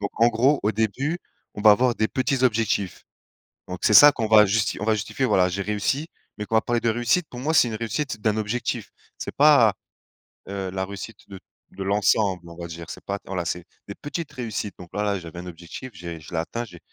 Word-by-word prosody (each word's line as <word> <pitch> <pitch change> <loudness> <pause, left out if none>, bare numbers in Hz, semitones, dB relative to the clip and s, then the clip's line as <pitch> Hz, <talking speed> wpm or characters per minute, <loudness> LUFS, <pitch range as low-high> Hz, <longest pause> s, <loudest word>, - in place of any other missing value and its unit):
Donc 100 - -3
en 115 - +7
gros 130 +6 +2
au 105 +2 +1
début, 130 - -1 0.4
on 105 - -6
va 105 -1 +8
avoir 120 +3 +2
des 110 -1 0
petits 130 0 -1
objectifs. 110 -5 0 0.6
Donc 90 0 -6
c'est 105 - +3
ça 145 +5 +10
qu'on 110 -5 -2
va 105 -1 +7
justi 105 +2 0
on 105 - -3
va 110 - +3
justifier, 110 +5 -2
voilà, 95 -6 +3
j'ai 100 +3 -3
réussi 105 +9 -1 0.3
mais 105 - -4
qu'on 110 - -2
va 110 - +5
parler 120 -1 0
de 115 - +1
réussite 120 +9 +1
pour 120 - -8
moi, 155 +5 -1
c'est 125 - +5
une 110 - -4
réussite 115 +2 -3
d'un 110 0 +1
objectif, 110 +3 -2 0.3
c'est - - -6
pas, 140 -8 +6 0.7
heu, 95 -1 -4
la 95 0 -2
réussite 100 +2 -8
de 95 - -9 0.3
de 95 - -6
l'ensemble, 100 -2 +1
on 85 - -11
va 85 0 -7
dire, 85 0 -9
c'est - - -9
pas, 100 0 -3
d - - -22
voilà, 90 -2 -3
c'est 85 +1 -4 0.2
des 100 - -7
petites 150 +1 -6
réussites 110 -6 -4
donc 90 -1 -11
là, 105 -1 -1
j'avais 85 -1 -9
un 90 - -8
objectif, 85 +9 -9
j'ai 85 -1 -7
je 75 - -13
l'ai 85 - -3
atteint, 115 +8 -3
j'ai 90 -7 -12
105 Hz, 230 wpm, -24 LUFS, 95-120 Hz, 0.7 s, ça